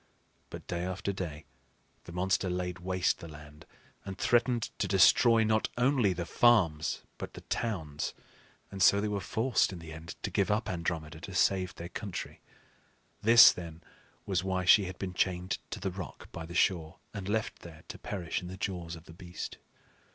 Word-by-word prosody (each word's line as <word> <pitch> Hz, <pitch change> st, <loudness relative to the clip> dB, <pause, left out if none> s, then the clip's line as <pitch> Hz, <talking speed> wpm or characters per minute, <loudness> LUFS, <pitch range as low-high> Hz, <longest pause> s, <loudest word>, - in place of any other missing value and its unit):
But -, -, -9 dB
day 85 Hz, 0 st, -3 dB
after 95 Hz, +2 st, -3 dB
day 80 Hz, -6 st, -6 dB, 0.6 s
the -, -, -9 dB
monster 95 Hz, +2 st, 0 dB
laid 90 Hz, 0 st, -3 dB
waste 90 Hz, 0 st, 0 dB
the 85 Hz, -, -8 dB
land, 75 Hz, 0 st, -13 dB, 0.4 s
and 95 Hz, -1 st, -7 dB
threatened 120 Hz, -1 st, +2 dB
to 100 Hz, -, +1 dB
destroy 110 Hz, +5 st, +5 dB
not 110 Hz, 0 st, +1 dB
only 125 Hz, -5 st, +3 dB
the 85 Hz, -1 st, -3 dB
farms, 85 Hz, -7 st, +3 dB, 0.2 s
but -, -, -7 dB
the -, -, -9 dB
towns; 80 Hz, -11 st, -3 dB, 0.6 s
and 100 Hz, -1 st, -6 dB
so 100 Hz, +2 st, +6 dB
they 105 Hz, -, 0 dB
were 105 Hz, -1 st, -1 dB
forced 110 Hz, +6 st, +1 dB
in 95 Hz, -, -7 dB
the 80 Hz, -1 st, -9 dB
end 80 Hz, +1 st, -8 dB
to -, -, -2 dB
give 100 Hz, -, +1 dB
up 105 Hz, +1 st, +1 dB
Andromeda 80 Hz, -3 st, -3 dB
to 95 Hz, +2 st, -8 dB
save 95 Hz, -2 st, +2 dB
their 85 Hz, +1 st, -7 dB
country. 100 Hz, -1 st, -6 dB, 0.8 s
This, 115 Hz, +1 st, +9 dB
then, 85 Hz, -1 st, -9 dB, 0.4 s
was 95 Hz, -2 st, 0 dB
why 95 Hz, -1 st, -1 dB
she 100 Hz, +2 st, +7 dB
had 90 Hz, 0 st, -6 dB
been 95 Hz, -2 st, -4 dB
chained 90 Hz, 0 st, -1 dB
to -, -, -5 dB
the -, -, -2 dB
rock -, -, -8 dB
by 80 Hz, -1 st, -7 dB
the 85 Hz, -, -9 dB
shore 85 Hz, -3 st, +1 dB, 0.2 s
and 100 Hz, -2 st, -5 dB
left 110 Hz, +1 st, -1 dB
there 80 Hz, -2 st, -12 dB
to -, -, -7 dB
perish 90 Hz, -5 st, -3 dB
in 90 Hz, -, -7 dB
the 95 Hz, +1 st, -7 dB
jaws 90 Hz, -4 st, -4 dB
of 80 Hz, -, -12 dB
the 80 Hz, -, -12 dB
beast. 90 Hz, +1 st, -7 dB
90 Hz, 185 wpm, -30 LUFS, 85-100 Hz, 0.8 s, This